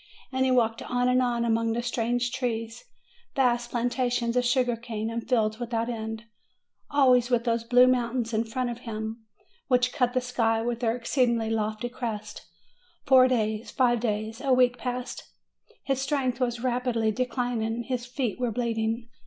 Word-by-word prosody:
And 260 Hz, 0 st, +1 dB
he -, -, +2 dB
walked 230 Hz, -3 st, +2 dB
on 245 Hz, 0 st, 0 dB
and 250 Hz, 0 st, +3 dB
on, 240 Hz, -1 st, 0 dB
among 230 Hz, 0 st, +1 dB
strange 240 Hz, 0 st, -1 dB
trees, 230 Hz, -, -3 dB, 0.5 s
vast 240 Hz, -3 st, +2 dB
plantations 245 Hz, 0 st, 0 dB
of 250 Hz, -, +3 dB
sugar 245 Hz, -1 st, +2 dB
cane, 225 Hz, -1 st, -4 dB
and 230 Hz, 0 st, -5 dB
fields 220 Hz, -3 st, +1 dB
without 235 Hz, -1 st, -2 dB
end, 220 Hz, -1 st, -4 dB, 0.7 s
always 255 Hz, -4 st, +4 dB
with 240 Hz, -2 st, +2 dB
those 230 Hz, -1 st, 0 dB
blue 245 Hz, +2 st, +6 dB
moun 250 Hz, -1 st, +1 dB
tains 230 Hz, +1 st, -9 dB
in 220 Hz, +1 st, +1 dB
front 245 Hz, +2 st, -2 dB
of 235 Hz, -, -7 dB
him, 220 Hz, -1 st, -6 dB, 0.4 s
which 250 Hz, -1 st, +2 dB
cut 245 Hz, -2 st, +1 dB
the -, -, +4 dB
sky 230 Hz, -3 st, +1 dB
with 235 Hz, 0 st, -2 dB
their 230 Hz, -2 st, +1 dB
ex 240 Hz, +2 st, -5 dB
ceedingly 235 Hz, -4 st, +2 dB
lofty 215 Hz, +1 st, -1 dB
crests. 235 Hz, -4 st, -6 dB, 0.6 s
Four 260 Hz, -1 st, +7 dB
days, 220 Hz, -3 st, -1 dB
five 240 Hz, -2 st, +2 dB
days 220 Hz, +1 st, -2 dB
a 275 Hz, -1 st, 0 dB
week, 250 Hz, -1 st, +3 dB
passed. 250 Hz, 0 st, -5 dB, 0.5 s
His 270 Hz, -1 st, -1 dB
strength 270 Hz, -3 st, -1 dB
was 240 Hz, -1 st, -1 dB
rapidly 245 Hz, -3 st, 0 dB
declining, 240 Hz, -1 st, -2 dB
his 250 Hz, -1 st, -3 dB
feet 245 Hz, -3 st, -3 dB
were 245 Hz, -1 st, 0 dB
bleeding. 230 Hz, 0 st, -1 dB
240 Hz, 170 wpm, -27 LUFS, 225-250 Hz, 0.7 s, Four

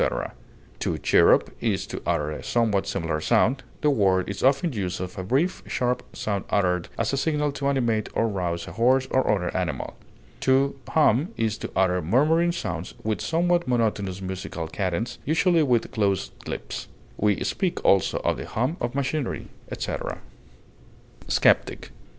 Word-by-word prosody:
To -, -, -1 dB
chirrup -, -, +4 dB
is -, -, 0 dB
to -, -, -6 dB
utter 75 Hz, -3 st, 0 dB
a 75 Hz, -, -6 dB
somewhat 105 Hz, -5 st, +1 dB
similar 80 Hz, -2 st, -2 dB
sound; 130 Hz, -, +2 dB, 0.2 s
the 150 Hz, -, +3 dB
word 95 Hz, -7 st, +2 dB
is 100 Hz, -, -5 dB
often 140 Hz, +4 st, +3 dB
used 95 Hz, -4 st, -3 dB
of 90 Hz, 0 st, -5 dB
a 95 Hz, -, -4 dB
brief, 135 Hz, -, 0 dB
sharp 125 Hz, 0 st, 0 dB
sound 100 Hz, -3 st, -2 dB
uttered 90 Hz, -3 st, +1 dB
as -, -, 0 dB
a -, -, +1 dB
signal 150 Hz, 0 st, +1 dB
to 140 Hz, 0 st, -3 dB
animate 120 Hz, -6 st, +1 dB
or 115 Hz, -, +2 dB
rouse 90 Hz, -5 st, -2 dB
a -, -, -7 dB
horse 130 Hz, +3 st, +3 dB
or 130 Hz, -, +2 dB
other 95 Hz, -4 st, -1 dB
animal. 85 Hz, -8 st, -2 dB, 0.5 s
To 135 Hz, +1 st, +2 dB
hum 150 Hz, -, +3 dB
is 110 Hz, -1 st, -1 dB
to -, -, -5 dB
utter 90 Hz, -1 st, +2 dB
murmuring 155 Hz, -, +3 dB
sounds 90 Hz, -, -4 dB
with 110 Hz, -4 st, -1 dB
somewhat 175 Hz, -1 st, +1 dB
monotonous 105 Hz, -6 st, 0 dB
musical 95 Hz, -3 st, -5 dB
cadence, 100 Hz, +6 st, -2 dB
usually 165 Hz, +3 st, +3 dB
with 125 Hz, -6 st, +1 dB
closed 100 Hz, -3 st, 0 dB, 0.2 s
lips; -, -, -5 dB, 0.3 s
we 105 Hz, -1 st, +1 dB
speak 180 Hz, -2 st, -2 dB
also 95 Hz, -2 st, +4 dB
of -, -, +1 dB
the -, -, -6 dB
hum 130 Hz, +10 st, -1 dB
of 120 Hz, +2 st, -2 dB
machinery, 140 Hz, 0 st, -2 dB, 0.2 s
etc. -, -, -4 dB, 1.1 s
SKEPTIC. -, -, +2 dB
115 Hz, 155 wpm, -25 LUFS, 95-140 Hz, 1.1 s, chirrup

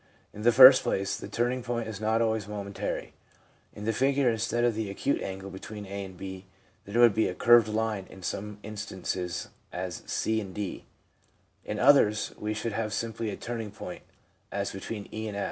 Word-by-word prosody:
In 105 Hz, -, -8 dB
the 120 Hz, +2 st, +5 dB
first 130 Hz, +2 st, +10 dB
place, 95 Hz, 0 st, -1 dB
the -, -, -7 dB
turning 120 Hz, +2 st, 0 dB
point 120 Hz, -2 st, -3 dB
is 110 Hz, -2 st, -6 dB
not 110 Hz, +1 st, +2 dB
always 110 Hz, -2 st, 0 dB
momentary. 100 Hz, -1 st, -4 dB, 0.6 s
In 105 Hz, -, -7 dB
the 115 Hz, -, +1 dB
figure, 135 Hz, +1 st, +3 dB
instead 115 Hz, +1 st, 0 dB
of 120 Hz, -1 st, +3 dB
the 110 Hz, -1 st, -3 dB
acute 100 Hz, +8 st, -1 dB
angle 95 Hz, 0 st, -5 dB
between 105 Hz, +2 st, -8 dB
a 100 Hz, +1 st, -5 dB
and 95 Hz, -1 st, -11 dB
b> 95 Hz, 0 st, -8 dB, 0.4 s
there 100 Hz, +4 st, -1 dB
would 120 Hz, -3 st, +7 dB
be 110 Hz, -, +2 dB
a 90 Hz, -, -4 dB
curved 120 Hz, 0 st, +6 dB
line 110 Hz, -3 st, -1 dB
in 95 Hz, -, -12 dB
some 105 Hz, +3 st, -4 dB
instances, 95 Hz, -4 st, -4 dB, 0.2 s
as 90 Hz, -1 st, -4 dB
c, 110 Hz, 0 st, 0 dB
d. 100 Hz, 0 st, -5 dB, 0.8 s
In -, -, -4 dB
others 110 Hz, -6 st, +4 dB
we 105 Hz, 0 st, -2 dB
should 110 Hz, +1 st, -3 dB
have 110 Hz, 0 st, -2 dB
simply 115 Hz, +1 st, -2 dB
a 100 Hz, -, -4 dB
turning 115 Hz, -2 st, -4 dB
point, -, -, -8 dB, 0.5 s
as 100 Hz, 0 st, -2 dB
between 100 Hz, +2 st, -6 dB
e 110 Hz, 0 st, -4 dB
and 100 Hz, -1 st, -5 dB
105 Hz, 185 wpm, -28 LUFS, 100-115 Hz, 0.8 s, first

